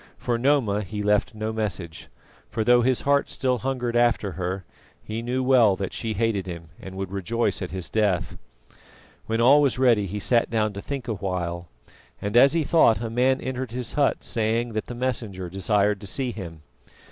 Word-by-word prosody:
For 120 -1 -1
Noma 120 -6 +2
he 105 +1 -5
left 105 +1 +1
no 110 +1 -3
message; 95 -7 -4 0.4
for 110 - -1
though 120 +2 +5
his 125 +1 +1
heart 140 0 +2
still 130 -2 0
hungered 125 -2 -2
after 120 -4 +2
her, 90 +1 -4 0.3
he 110 +1 -5
knew 125 +2 -1
well 125 -6 +5
that 95 -1 -4
she 115 -2 -3
hated 105 -3 -1
him 85 -2 -7
and 95 0 -9
would 95 -1 -5
rejoice 105 +5 -1
at 90 - -3
his 90 -2 -5
death. 105 -5 0 0.9
When 115 0 -1
all 135 +5 +6
was 135 -4 +2
ready 120 -6 +3
he 105 +3 -4
sat 115 +3 +2
down 110 -2 0
to 100 - -6
think 140 0 -5
a 115 - -1
while, 90 -3 -3 0.5
and 100 +2 -4
as 135 +4 +7
he 165 -1 +1
thought, 145 -7 +4
a 115 -1 -4
man 130 +3 +2
entered 130 -2 -4
his 125 -2 -3
hut 145 -2 +1
saying 115 +1 -1
that 110 -1 -4
the 120 - -6
Messenger 110 -8 -3
desired 100 +1 +1
to 100 - -8
see 130 +5 -2
him. 85 -8 -8
110 Hz, 195 wpm, -24 LUFS, 100-125 Hz, 0.9 s, as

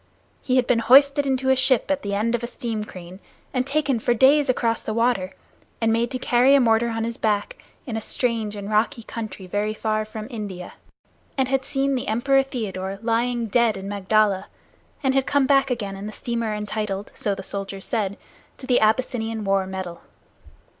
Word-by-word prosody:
He 255 - 0
had 255 -1 +3
been 240 -1 +2
hoisted 280 +4 +5
into 265 0 +1
a - - +5
ship 260 0 +2
at 285 0 0
the 200 0 -3
end 225 +3 0
of 240 - 0
a 235 - -3
steam 225 -3 -4
crane 185 -2 -10 0.3
and 255 0 0
taken 280 -4 +1
for 240 +2 +1
days 275 +4 +5
across 230 -2 +1
the 215 - -4
water, 230 -6 +1 0.5
and 225 -1 +2
made 230 +1 +1
to 255 - -3
carry 250 +2 +4
a - - +6
mortar 235 -1 +3
on 225 -1 -2
his 230 0 -3
back 210 -2 -1 0.2
in 235 - -4
a 220 - -2
strange 225 -2 -1
and 200 -1 -6
rocky 220 +4 0
country 215 -4 -7
very 205 +3 -2
far 215 0 -1
from 215 0 -7
India, 200 -6 -6 0.6
and 265 -1 +1
had 270 0 +1
seen 275 0 0
the 255 - -2
Emperor 270 +5 +3
Theodore 195 -7 -4
lying 235 +1 0
dead 225 -1 +2
in 195 0 -7
Magdala, 200 0 +1 0.6
and 265 -1 +2
had 270 -1 +1
come 285 -1 +3
back 275 0 +3
again 210 -6 -3
in 195 +2 -7
the - - -5
steamer 230 0 -3
entitled, 210 -1 -4
so 200 -2 -1
the 195 - -7
soldiers 195 0 -5
said, 200 -4 -2 0.4
to 260 - -10
the 255 -1 +3
Abyssinian 225 0 0
War 195 -1 +1
medal. 190 -2 -6
225 Hz, 195 wpm, -23 LUFS, 205-255 Hz, 0.6 s, a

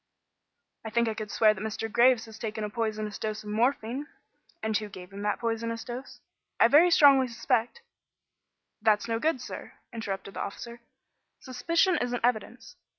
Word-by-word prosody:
"I 220 - -5
think 235 +1 +1
I 220 - 0
could 215 -1 -6
swear 215 +1 +4
that 200 - -9
Mr. 220 +1 -3
Graves 235 +1 +4
had 220 - -13
taken 220 -1 -4
a 210 - -4
poisonous 215 -2 -3
dose 215 0 -4
of 210 - -8
morphine." 245 +4 0 0.6
"And 220 0 -1
who 210 0 -1
gave 185 -1 -11
him 200 - -7
that 210 0 0
poisonous 230 0 -2
dose?" 245 +2 -8 0.4
"I 230 - +6
very 315 +6 +7
strongly 280 -5 +6
suspect 235 - -1 0.5
" - - -56
"That's 215 0 +2
no 225 -1 -1
good, 315 0 +1
sir," - - -8 0.2
interrupted 195 -3 -5
the - - -5
officer. 235 +4 -7 0.6
"Suspicion 335 +7 +1
isn't 245 -1 -1
evidence. 245 -3 -2
230 Hz, 170 wpm, -28 LUFS, 215-245 Hz, 0.6 s, very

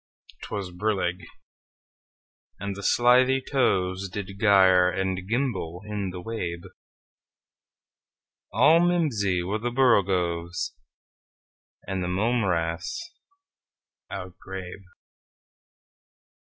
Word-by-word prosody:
'T - - -7
was 95 -3 -4
brillig, 90 -2 -2 1.3
and 100 0 -4
the 100 - -7
slithy 125 +5 +4
tovesDid 100 -6 -1
gyre 95 -4 +5
and 95 0 -3
gimble 105 -8 -2
in 105 -2 -3
the 90 0 -7
wabe; 90 -4 -4 1.9
All 155 +5 +5
mimsy 135 - +1
were 100 +5 -2
the 120 +2 -2
borogoves, 90 -8 +1 1.1
And 95 -1 -3
the - - -2
mome 110 +6 +1
raths 90 - -2 1.0
outgrabe. 95 +1 -8
95 Hz, 85 wpm, -26 LUFS, 90-115 Hz, 1.9 s, gyre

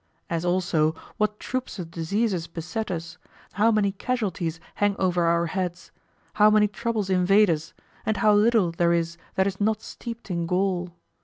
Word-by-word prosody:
As 165 0 -1
also 175 -3 +1 0.2
what 210 0 0
troops 255 -3 -4
of 170 -3 -6
diseases 175 +1 -1
beset 175 +7 -4
us, 165 -2 -5 0.3
how 210 +4 +3
many 210 -2 +2
casualties 190 -7 -2
hang 205 -1 +1
over 180 -2 +1
our 170 0 +2
heads, 180 0 -4 0.4
how 210 0 +6
many 215 0 +5
troubles 210 -1 -2
invade 190 +2 +4
us, 160 0 -4 0.3
and 220 -1 0
how 210 -1 +4
little 210 -3 +4
there 170 0 +2
is 170 0 -1 0.2
that 190 - +3
is 195 0 -3
not 215 +1 +1
steeped 230 -4 -8
in 170 -1 -1
gall? 180 0 0
190 Hz, 165 wpm, -25 LUFS, 170-210 Hz, 0.4 s, how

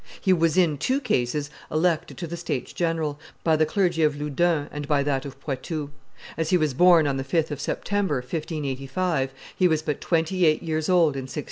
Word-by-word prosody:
He 190 - +3
was 165 -1 +2
in, 160 -6 +3
two 260 - +1
cases 145 - -1 0.2
elected 160 +1 0
to 175 - -4
the 170 +1 -5
states 165 -7 -4
general, 160 -4 -1 0.2
by 160 -1 +3
the 155 0 +2
clergy 175 -2 +1
of 150 -2 +2
Loudun 150 +1 +1
and 145 -1 -5
by 145 -2 +2
that 140 -1 -1
of 135 -1 -9
Poitou. 145 +2 -4 0.5
As 160 -1 -1
he 180 - +4
was 155 -5 0
born 175 +2 +6
on 140 -2 0
the 135 - -2
5th 155 +3 0
of 145 -1 -4
September, 200 0 -1
1585, 135 +1 -2 0.2
he 185 - +4
was 155 -2 +1
but 150 -3 -2
twenty 170 +2 +1
eight 155 +2 +2
years 160 -1 -1
old 170 -5 +4
in 135 -1 -4
1614. 150 - -4
155 Hz, 205 wpm, -25 LUFS, 145-170 Hz, 0.5 s, born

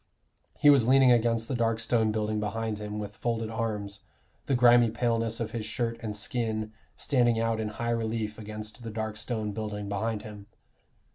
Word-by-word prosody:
He 145 -1 +7
was 130 -5 +4
leaning 130 -1 +6
against 115 -1 +2
the - - -3
dark 115 -2 +1
stone 115 -1 +2
building 105 0 -1
behind 105 0 -2
him 105 0 -5
with 105 -1 -6
folded 115 0 -2
arms, 105 -3 -3 0.5
the 135 - +2
grimy 120 -1 +6
paleness 115 -1 0
of 115 -2 -3
his 115 -2 -3
shirt 115 +1 -2
and 105 -2 -4
skin 110 -1 -2 0.2
standing 120 -5 +2
out 115 -1 0
in 110 - -1
high 115 +2 -3
relief 110 -2 -2
against 110 +2 -7
the 115 - -6
dark 110 0 -4
stone 110 -1 -3
building 105 -1 -4
behind 105 +1 -2
him. 105 -2 -10
110 Hz, 180 wpm, -28 LUFS, 105-115 Hz, 0.5 s, He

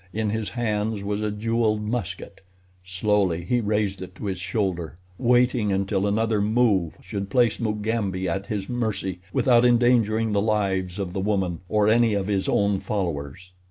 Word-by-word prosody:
In 110 -1 -1
his 110 -1 -2
hands 110 -3 -2
was 105 +1 -2
a 105 - 0
jeweled 110 0 0
musket. 100 -5 -4 0.4
Slowly 95 -2 0
he 120 +6 +1
raised 105 -3 -1
it 95 0 -8
to 105 - -7
his 95 -3 -3
shoulder, 90 -4 -2 0.2
waiting 120 -3 +3
until 95 +1 0
another 110 0 +1
move 105 -6 +2
should 100 -1 -5
place 120 -1 +2
Mugambi 105 -4 -1
at 95 +3 -2
his 100 -3 -3
mercy 110 -7 -2
without 120 +1 +4
endangering 120 -2 +3
the 100 -1 +2
lives 95 -4 0
of 95 -3 -4
the 95 - -2
woman 95 -4 -1
or 105 -1 +2
any 115 -1 +4
of 100 -1 -1
his 100 -1 -1
own 100 -1 +2
followers. 90 -4 -4
105 Hz, 160 wpm, -24 LUFS, 95-110 Hz, 0.4 s, without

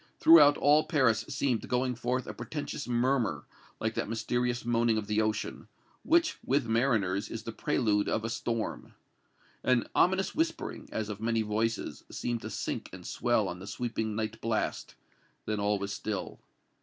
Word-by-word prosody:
Throughout 150 -3 +8
all 150 +2 +4
Paris 130 -9 +2
seemed 135 -4 -1
going 125 0 +1
forth 125 +2 -2
a - - -6
portentous 150 -1 -5
murmur, 120 - +1 0.3
like - - -1
that - - -2
mysterious 120 +2 -1
moaning 120 -1 +2
of 110 - -2
the 105 +1 +1
ocean, 110 0 -2 0.3
which, 335 -1 +2
with 135 0 +1
mariners, 110 -5 +1
is 115 -1 -6
the 115 - -5
prelude 110 -5 +1
of 110 - -1
a - - -1
storm. 115 -1 -3 0.7
An 125 -2 +3
ominous 190 +2 +2
whispering, 330 +1 -2
as 110 -1 -3
of 105 0 -6
many 115 0 +1
voices, 110 +1 -2
seemed 120 -2 -3
to - - -6
sink - - -4
and - - -10
swell - - +1
on 90 - -5
the 95 - -9
sweeping 110 0 -3
night 110 0 -3
blast; 115 -1 -2 0.5
then 110 -1 -1
all 105 0 +1
was 100 0 -4
still. 105 -3 -4
115 Hz, 165 wpm, -30 LUFS, 110-130 Hz, 0.7 s, Throughout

